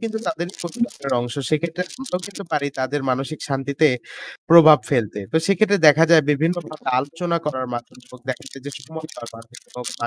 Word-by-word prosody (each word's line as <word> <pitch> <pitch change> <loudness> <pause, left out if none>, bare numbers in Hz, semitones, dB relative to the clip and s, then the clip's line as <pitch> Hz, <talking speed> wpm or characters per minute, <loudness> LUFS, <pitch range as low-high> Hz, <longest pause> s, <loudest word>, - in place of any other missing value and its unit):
কিন্তু 220 -1 -3
তাদের 170 +2 -2
পরিবারের 175 - -3
অংশ। 120 0 -5 0.2
সেক্ষেত্রে 165 +3 -1 0.2
আমরাও 215 -9 -3
কিন্তু 200 0 -8
পারি 145 -2 0
তাদের 135 +3 -1
মানসিক 135 +4 -2
শান্তিতে 140 +3 +1 0.6
প্রভাব 160 -2 +9
ফেলতে। 110 -6 0
তো - - +2
সেক্ষেত্রে 200 +1 +3
দেখা 155 +2 +6
যায় 160 -2 +7
বিভিন্নভাবে 160 +1 -2
আলোচনা 165 +5 -2
করার 130 -3 -2
মাধ্যমে 120 +1 -8
হোক 125 - -13
দেখা 130 - -6
যায় 135 - -10
যে - - -4 0.2
সময়টা 160 +1 -9
মাধ্যমে 115 +2 -13 0.2
হোক 125 - -6
বা 120 - -1
155 Hz, 175 wpm, -21 LUFS, 130-170 Hz, 0.6 s, প্রভাব